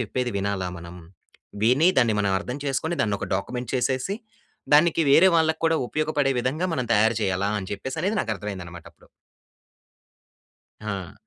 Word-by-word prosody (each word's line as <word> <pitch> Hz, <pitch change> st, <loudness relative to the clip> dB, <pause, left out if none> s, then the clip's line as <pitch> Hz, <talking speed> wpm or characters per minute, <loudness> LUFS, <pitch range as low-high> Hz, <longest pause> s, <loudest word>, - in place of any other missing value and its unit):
చెప్పేది 125 Hz, +2 st, -2 dB
వినాలా 95 Hz, -2 st, -2 dB
మనం. 85 Hz, +1 st, -10 dB, 0.7 s
విని 130 Hz, +9 st, +4 dB
దాన్ని 115 Hz, -4 st, +3 dB
మనం 100 Hz, -1 st, +1 dB
అర్థం 125 Hz, +7 st, -5 dB
చేసుకొని 150 Hz, +5 st, -1 dB
దాన్ని 105 Hz, -2 st, 0 dB
ఒక -, -, -3 dB
డాక్యుమెంట్ 125 Hz, +6 st, -4 dB
చేసేసి, 130 Hz, -, -1 dB, 0.6 s
దానికి 165 Hz, +2 st, +4 dB
వేరే 175 Hz, +7 st, +7 dB
వాళ్ళక్కూడా 160 Hz, 0 st, +2 dB
ఉపయోగపడే 150 Hz, -2 st, 0 dB
విధంగా 150 Hz, +9 st, -1 dB
మనం 125 Hz, -, -1 dB
తయారు 110 Hz, +1 st, +3 dB
చేయాలా 95 Hz, +1 st, 0 dB
అని 95 Hz, -, -6 dB
చెప్పేసి 130 Hz, +10 st, -5 dB
అనేది 205 Hz, +3 st, 0 dB
నాకు 110 Hz, -, -3 dB
అర్థం 105 Hz, +2 st, -7 dB
అయిందనమాటప్పుడు. 85 Hz, -2 st, -11 dB, 1.8 s
ఆ! 100 Hz, -4 st, -5 dB
125 Hz, 145 wpm, -24 LUFS, 100-155 Hz, 1.8 s, వేరే